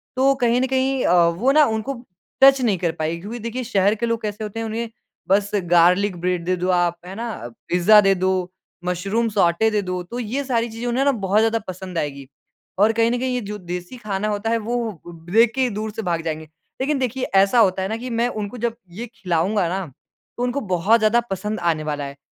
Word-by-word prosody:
तो 270 Hz, +1 st, +4 dB
कहीं 240 Hz, 0 st, +3 dB
न 260 Hz, -, +1 dB
कहीं 265 Hz, 0 st, 0 dB
अ, 175 Hz, -1 st, +5 dB
वो 180 Hz, +11 st, +1 dB
ना 300 Hz, +1 st, +6 dB
उनको 235 Hz, +2 st, -3 dB, 0.4 s
टच 270 Hz, 0 st, +7 dB
नहीं 220 Hz, -6 st, +2 dB
कर 170 Hz, -1 st, 0 dB
पाएँगी 160 Hz, +2 st, -2 dB
क्योंकि 220 Hz, +6 st, -6 dB
देखिए, 235 Hz, +3 st, -4 dB
शहर 205 Hz, -3 st, +2 dB
के 220 Hz, -, -2 dB
लोग 230 Hz, -1 st, -1 dB
कैसे 210 Hz, 0 st, -4 dB
होते 215 Hz, +1 st, -5 dB
हैं, 225 Hz, -, -3 dB
उन्हें 225 Hz, +1 st, -3 dB, 0.4 s
बस 200 Hz, +1 st, +3 dB, 0.2 s
गार्लिक 180 Hz, +3 st, +4 dB
ब्रेड 180 Hz, -1 st, -1 dB
दे 185 Hz, +1 st, +1 dB
दो 180 Hz, +1 st, -2 dB
आप, 175 Hz, -1 st, +2 dB
है 185 Hz, -, -8 dB
ना? 230 Hz, +3 st, -4 dB, 0.4 s
पिज़्ज़ा 180 Hz, +5 st, +6 dB
दे 195 Hz, -1 st, +4 dB
दो, 185 Hz, +1 st, 0 dB, 0.6 s
मशरूम 195 Hz, +6 st, 0 dB
सौटे 200 Hz, +1 st, +2 dB
दे 210 Hz, -1 st, +1 dB
दो। 180 Hz, -1 st, -3 dB
तो 235 Hz, +8 st, -7 dB
ये 250 Hz, +4 st, -2 dB
सारी 235 Hz, -3 st, 0 dB
चीज़ें 225 Hz, +2 st, -5 dB
उन्हें 245 Hz, +3 st, +1 dB
ना 280 Hz, -, +5 dB
बहुत 205 Hz, -4 st, +1 dB
ज़्यादा 225 Hz, +1 st, +2 dB
पसंद 185 Hz, -1 st, -6 dB
आएँगी 140 Hz, -3 st, -4 dB, 0.5 s
और 210 Hz, +2 st, +5 dB
कहीं 230 Hz, +1 st, +2 dB
न 245 Hz, -, 0 dB
कहीं 255 Hz, 0 st, -1 dB
ये 250 Hz, -, -1 dB
जो 210 Hz, 0 st, -6 dB
देसी 180 Hz, +4 st, -7 dB
खाना 210 Hz, -2 st, -3 dB
होता 210 Hz, +1 st, -2 dB
है, 230 Hz, -, +2 dB
वो 225 Hz, -4 st, -3 dB, 0.3 s
देख 225 Hz, +4 st, +5 dB
के 265 Hz, -, 0 dB
ही 255 Hz, -, +2 dB
दूर 215 Hz, 0 st, -3 dB
से 225 Hz, +1 st, -5 dB
भाग 170 Hz, -5 st, -1 dB
जाएँगे। 160 Hz, -1 st, -4 dB, 0.4 s
लेकिन 280 Hz, +1 st, 0 dB
देखिए, 255 Hz, 0 st, -2 dB
ऐसा 195 Hz, +4 st, +3 dB
होता 190 Hz, -4 st, +3 dB
है 190 Hz, -, -1 dB
ना 220 Hz, -, -2 dB
कि 250 Hz, +2 st, -6 dB
मैं 235 Hz, 0 st, +1 dB
उनको 215 Hz, 0 st, -5 dB
जब 235 Hz, 0 st, -2 dB, 0.2 s
ये 215 Hz, +7 st, -6 dB
खिलाऊँगा 180 Hz, +2 st, 0 dB
ना, 190 Hz, +1 st, -2 dB, 0.5 s
तो 245 Hz, -, -2 dB
उनको 250 Hz, +3 st, -1 dB
बहुत 200 Hz, +7 st, +4 dB
ज़्यादा 215 Hz, +2 st, +3 dB
पसंद 210 Hz, +2 st, -3 dB
आने 165 Hz, -3 st, 0 dB
वाला 145 Hz, -2 st, -3 dB
है। 140 Hz, 0 st, -9 dB
210 Hz, 230 wpm, -22 LUFS, 180-235 Hz, 0.6 s, टच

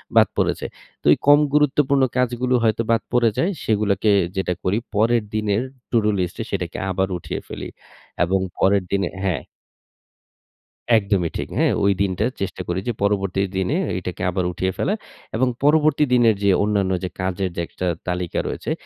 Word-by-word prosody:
বাদ -, -, +7 dB
পড়েছে। -, -, 0 dB, 0.4 s
তো -, -, -36 dB
এই -, -, 0 dB
কম 145 Hz, 0 st, +8 dB
গুরুত্বপূর্ণ 145 Hz, -2 st, +3 dB
কাজগুলো 125 Hz, 0 st, +1 dB
হয়তো 115 Hz, 0 st, +2 dB
বাদ 115 Hz, -1 st, +3 dB
পড়ে 120 Hz, -1 st, +4 dB
যায়, 180 Hz, -, +1 dB
সেগুলাকে 105 Hz, -1 st, +1 dB, 0.3 s
যেটা 95 Hz, -2 st, 0 dB
করি, 95 Hz, +3 st, +1 dB, 0.2 s
পরের 115 Hz, +2 st, +3 dB
দিনের 105 Hz, 0 st, +1 dB, 0.3 s
টু-ডু 110 Hz, -3 st, +3 dB
লিস্টে 90 Hz, -1 st, -2 dB
সেটাকে -, -, -3 dB
আবার 95 Hz, +1 st, 0 dB
উঠিয়ে 85 Hz, -, -5 dB
ফেলি -, -, -6 dB, 0.5 s
এবং 95 Hz, +3 st, +1 dB, 0.2 s
পরের 100 Hz, 0 st, +3 dB
দিনে 100 Hz, -2 st, +1 dB
হ্যাঁ। 90 Hz, -7 st, -1 dB, 1.5 s
একদমই 100 Hz, -5 st, 0 dB
ঠিক। -, -, -4 dB
হ্যাঁ, -, -, +3 dB
ওই 100 Hz, -, +5 dB
দিনটা 100 Hz, +1 st, +1 dB, 0.2 s
চেষ্টা 95 Hz, -1 st, -3 dB
করি 90 Hz, +1 st, -1 dB
যে, 120 Hz, -, 0 dB
পরবর্তী 100 Hz, -2 st, +1 dB, 0.2 s
দিনে 95 Hz, -, 0 dB, 0.2 s
এটাকে 90 Hz, 0 st, -6 dB
আবার 95 Hz, 0 st, -1 dB
উঠিয়ে 95 Hz, +2 st, -1 dB
ফেলা 200 Hz, -, 0 dB, 0.4 s
এবং 130 Hz, +3 st, +2 dB, 0.2 s
পরবর্তী 150 Hz, 0 st, +4 dB
দিনের 120 Hz, -3 st, +5 dB
যে 100 Hz, -, +4 dB
অন্যান্য 100 Hz, -2 st, +1 dB
যে 90 Hz, -, -2 dB
কাজের 95 Hz, 0 st, -1 dB
যে -, -, -1 dB
একটা 90 Hz, -, -4 dB, 0.2 s
তালিকা 90 Hz, -1 st, -2 dB
রয়েছে, -, -, -4 dB
100 Hz, 160 wpm, -22 LUFS, 95-120 Hz, 1.5 s, কম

